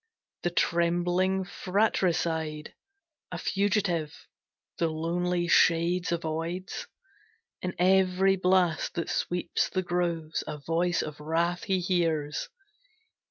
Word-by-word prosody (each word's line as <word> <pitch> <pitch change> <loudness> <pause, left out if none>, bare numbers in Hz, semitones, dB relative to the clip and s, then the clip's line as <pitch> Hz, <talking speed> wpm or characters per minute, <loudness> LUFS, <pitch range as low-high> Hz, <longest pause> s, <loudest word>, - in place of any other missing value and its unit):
The 175 - 0
trembling 175 +3 +1
fratricide, 170 -6 0 0.6
a - - -4
fugitive, 190 -6 -1 0.5
The 170 - +2
lonely 175 +2 -1
shades 170 +1 +3
avoids; 170 +3 -3 0.7
in 180 -1 -3
every 190 +1 +4
blast 180 -3 +2
That 170 - -2
sweeps 175 0 -1
the 185 -1 -1
groves, 170 -3 -1
a - - -4
voice 165 +4 0
of 150 -1 -7
wrath 170 +3 -1
he 190 -1 +1
hears. 165 -5 0
175 Hz, 100 wpm, -28 LUFS, 165-185 Hz, 0.7 s, every